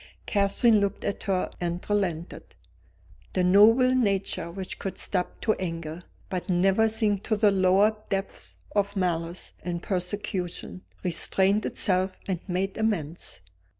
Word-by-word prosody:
Catherine 205 +2 +3
looked 200 0 -1
at 200 - -2
her 190 -3 0
and 175 0 -3
relented. 185 -5 -2 0.8
The 185 - +1
noble 225 +7 +6
nature 200 -8 0
which 185 +2 -6
could 195 - -5
stoop 180 -3 0
to 220 - +2
anger, 165 -2 -4 0.3
but 185 -1 -4
never 195 +5 +3
sink 215 -3 +1
to 220 - +1
the 210 -1 +4
lower 195 +3 +4
depths 195 -1 -2 0.2
of 200 0 +1
malice 175 -2 -2
and 175 -1 -4
persecution, 185 -1 -3 0.2
restrained 190 +3 +2
itself 185 0 +1
and 185 -3 -1
made 190 +1 -2
amends. 175 - -2
190 Hz, 130 wpm, -26 LUFS, 180-205 Hz, 0.8 s, noble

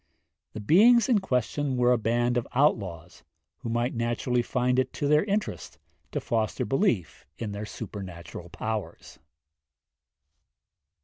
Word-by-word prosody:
The - - -6
beings 215 - +5
in 230 -5 +4
question 135 - -1
were 125 0 +4
a 125 - +4
band 120 +2 +1
of 120 - -1
outlaws, 100 - 0 0.4
who 115 - -5
might 120 +2 0
naturally 120 +1 0
find 125 +1 +1
it 130 - 0
to 145 - -2
their 150 +1 +4
interest 205 0 -3 0.3
to - - -1
foster 110 -2 -1
belief 125 - 0
in 110 -3 -4
their 100 +1 -5
supernatural 90 -5 -8
powers. 105 -3 -5
120 Hz, 130 wpm, -27 LUFS, 105-135 Hz, 0.4 s, beings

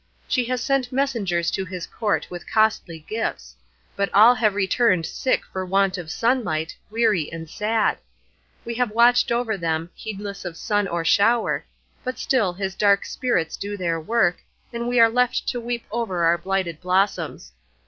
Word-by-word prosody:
She 250 -2 +1
has 250 0 -2
sent 270 -3 0
messengers 225 -11 0
to 190 - -2
his 180 -2 -6
court 215 -3 -1
with 175 -1 -8
costly 195 -7 +1
gifts; 65 - -4 0.4
but 200 0 -1
all 220 +4 +8
have 220 -4 +1
returned 190 -3 +2
sick 260 - -1
for 190 - -5
want 195 0 +1
of 175 -4 -7
sunlight, 180 -8 0
weary 215 -8 +1
and 165 0 -7
sad; 215 +6 0 0.7
we 235 - -3
have 245 0 0
watched 235 +3 +4
over 235 -3 0
them, 165 -1 -2
heedless 205 -2 -7
of 175 -3 -6
sun 205 -1 0
or 170 -2 -2
shower, 225 +6 +2 0.4
but 255 0 -4
still 225 -9 +1
his 190 +1 -4
dark 200 0 +3
spirits 180 - -1
do 205 +1 -5
their 170 -3 -1
work, 175 0 +1 0.3
and 235 0 -3
we 245 0 +2
are 230 - +8
left 250 +2 0
to 245 - -3
weep 235 0 -4
over 210 -7 -1
our 170 +1 +3
blighted 185 -3 -2
blossoms. 185 - 0
205 Hz, 170 wpm, -23 LUFS, 175-235 Hz, 0.7 s, all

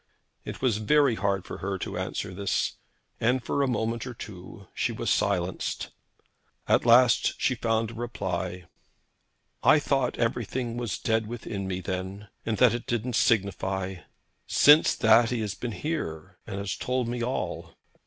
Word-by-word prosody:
It - - -7
was 120 -5 +2
very 140 +4 +4
hard 100 -3 -1
for - - -7
her 95 0 -2
to - - -5
answer - - -3
this, 100 0 -1 0.4
and 125 +2 +1
for 140 - 0
a 140 - +2
moment 115 0 -1
or 125 - -7
two 100 -1 -10
she - - -1
was - - -2
silenced. 90 -2 -1 0.8
At - - +3
last 120 +1 +5
she 130 - +2
found 115 -2 0
a - - -10
reply. 95 -6 -4 1.0
'I - - +6
thought 135 -4 0
everything 120 +1 -1
was 120 -5 -3
dead 110 -1 0
within 105 -4 -5
me 95 -1 -3
then, 95 +3 -5 0.2
and 110 -2 0
that 125 0 +5
it 120 - -4
didn't 120 +1 -1
signify. 95 -5 +1 0.5
Since 150 +2 +6
that 115 0 +5
he 120 -2 -1
has 105 -3 -2
been 115 +4 -5
here, 95 - -4
and 100 - -5
he - - -3
has 100 -1 -3
told 125 -1 -1
me 120 0 -2
all.' 125 +2 -3
115 Hz, 165 wpm, -27 LUFS, 95-120 Hz, 1.0 s, I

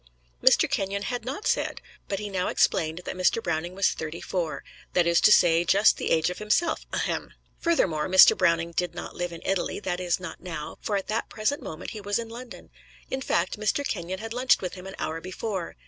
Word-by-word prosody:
Mr. - - +6
Kenyon 200 +1 -1
had 240 +1 -3
not 270 +11 -5
said; - - 0 0.3
but 195 - -2
he 210 +1 -4
now 185 -2 -1
explained 160 +2 +1
that - - -4
Mr. 185 +3 +2
Browning 170 -2 -3
was 195 - +3
thirty 160 +1 -5
four, 170 -5 -3 0.3
that 175 - +3
is 170 0 +3
to 210 - +6
say, 170 -4 +5
just 200 +4 +4
the - - -2
age 165 +2 +2
of 180 - -7
himself, 210 +11 0
ahem! - - -2 0.2
Furthermore, 185 - +1
Mr. 190 0 +8
Browning 170 -2 +2
did 175 +1 -2
not 175 - -7
live 175 0 -3
in 170 - -9
Italy 190 -2 -1
that 180 -3 -3
is, 180 -1 0
not 185 -3 -8
now, 165 -4 -6
for 210 - -1
at 195 - -4
that 220 +2 -2
present 225 +7 -1
moment 160 +2 -7
he 215 - -7
was 205 0 -1
in 230 -1 -5
London. 240 +2 -10 0.4
In 265 - -2
fact, 185 -4 0
Mr. 245 +7 0
Kenyon 180 -1 -3
had 225 +3 -6
lunched 250 +1 +3
with 185 - -4
him 185 0 -9
an 190 - -8
hour 165 +1 -3
before. 185 0 -4
185 Hz, 215 wpm, -26 LUFS, 170-215 Hz, 0.4 s, Mr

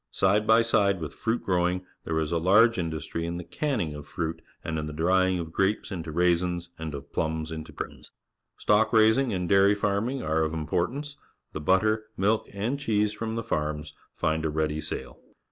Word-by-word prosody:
Side 105 +3 +2
by 110 +1 +6
side 100 -4 +2
with 80 -3 -5
fruit 115 +1 -1
growing, 90 0 +1 0.2
there 80 - -1
is 80 -1 -2
a 85 - +1
large 105 +6 +5
industry 80 -1 -3
in 85 +1 -3
the 90 - -5
canning 105 - -2
of 75 -1 -9
fruit 80 -1 -3 0.2
and 80 -1 -2
in 75 - -4
the 75 - -6
drying 95 +3 +2
of 80 -2 -5
grapes 100 +3 0
into 85 -4 -5
raisins 85 +1 +1
and 80 -2 -4
of 70 - -10
plums 80 0 -1
into 80 -1 -6
prunes. - - -8 0.5
Stock 110 +2 +3
raising 110 +3 +5
and 90 -3 -1
dairy 100 +1 +5
farming 105 +6 -1
are 80 +1 +1
of 80 0 -1
im 80 -1 -3
portance. 135 - -2 0.4
The 75 - -4
butter, 110 +6 +2
milk, 105 +3 +1
and 110 +8 -2
cheese 105 -6 +1
from 110 +1 -4
the 115 - -2
farms 75 -6 -2 0.2
find 80 0 0
a 80 - 0
ready 75 0 -1
sale. - - -5
90 Hz, 195 wpm, -27 LUFS, 80-110 Hz, 0.5 s, by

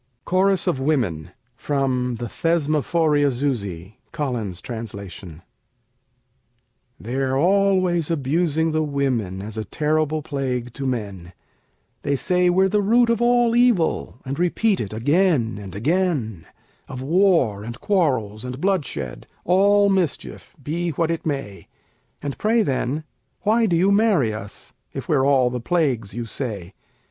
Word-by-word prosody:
CHORUS 190 +1 +2
OF 130 - 0
WOMEN 120 - 0 0.3
From 130 -2 -1
the 120 +1 -5
'Thesmophoriazusæ': 145 - 0
Collins's 120 - -3
Translation 100 -8 -8 1.6
They're 130 +3 -1
always 185 -1 +2
abusing 160 +1 0
the 155 0 +1
women, 130 -10 -1
As 110 +1 -6
a - - -2
terrible 155 +5 0
plague 125 -4 -3
to 135 0 -4
men: 100 -8 -4 0.7
They 140 - 0
say 180 +5 +2
we're 190 +2 +4
the 210 +2 +1
root 235 +3 +4
of 230 0 0
all 240 -1 +3
evil, 240 - +2
And 135 +3 -4
repeat 190 +4 +1
it 105 - -4
again 130 - +1
and 95 -2 -9
again; 130 - -1 0.4
Of 130 - -7
war, 160 - +2
and 115 +2 -7
quarrels, 130 - 0
and 125 +1 -6
bloodshed, 185 -6 -2 0.2
All 200 +3 +4
mischief, 190 -1 -2
be 170 +5 -2
what 165 +1 0
it 165 -1 -3
may! 135 -10 -4 0.6
And 140 -2 -4
pray, 225 +1 +3
then, 140 +1 -1 0.4
why 225 +2 +3
do 175 - +1
you 185 +4 +3
marry 200 - +3
us, 105 -2 -8 0.2
If - - -6
we're 135 +1 +2
all 130 -3 +3
the 125 -1 -4
plagues 130 - 0
you 120 -1 -3
say? 105 -7 -5
140 Hz, 135 wpm, -22 LUFS, 115-180 Hz, 1.6 s, we're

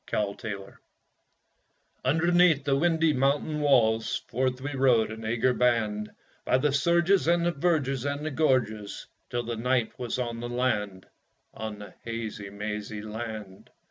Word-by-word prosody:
After 105 +1 -2
the 100 -2 -4
Hunt 95 - -15 1.3
Underneath 165 +1 +4
the 140 -1 +2
windy 160 +1 +3
mountain 140 +3 +1
walls 115 -6 +2
Forth 130 +1 0
we 145 +2 -4
rode, 125 -5 +3
an 110 0 -8
eager 120 +3 +1
band, 110 -4 +1 0.3
By - - +3
the 140 +1 +1
surges 170 +5 +3
and 170 0 +3
the 175 - +2
verges 140 -5 0
and 145 +1 -2
the 155 - -2
gorges, 120 -8 0 0.2
Till 120 0 -2
the 115 -1 -4
night 125 0 0
was 125 0 -3
on 120 -2 -3
the 120 +1 -5
land 105 -6 -1 0.5
On 110 -1 -6
the 105 -2 -10
hazy, 110 -3 -5
mazy 105 +1 -5
land! 110 -3 -7
125 Hz, 150 wpm, -27 LUFS, 110-145 Hz, 1.3 s, Underneath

